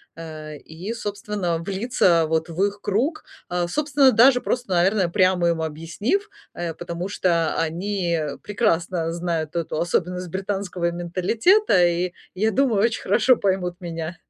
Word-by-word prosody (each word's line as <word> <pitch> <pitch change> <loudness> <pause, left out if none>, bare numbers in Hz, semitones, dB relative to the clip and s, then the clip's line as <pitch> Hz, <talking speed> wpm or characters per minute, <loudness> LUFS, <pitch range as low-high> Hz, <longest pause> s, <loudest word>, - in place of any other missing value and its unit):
Э, 155 -2 -8
и, 170 +10 -7
собственно, 205 -5 -3
влиться, 190 -3 +2
вот, 160 +1 0
в 170 +4 -1
их 205 0 -4
круг. 250 - -1 0.2
Э, 175 -1 -1
собственно, 280 - +3
даже 250 +2 +5
просто, 245 -4 -2
наверное, 185 +1 +3
прямо 185 -2 +3
им 165 -1 0
объяснив, 170 - -2 0.2
э, 170 -2 -4
потому 175 +3 -5
что 170 -5 +1
они 170 +1 -1 0.2
прекрасно 175 -6 0
знают 170 -2 -3
эту 165 -2 -2
особенность 180 +1 -1
британского 190 -2 -2
менталитета 185 - +2
и, 175 +1 0 0.2
я 215 +4 +1
думаю, 235 -6 +2
очень 230 - 0
хорошо 250 +3 +4
поймут 185 -3 -1
меня. 165 0 -5
180 Hz, 140 wpm, -23 LUFS, 170-205 Hz, 0.2 s, даже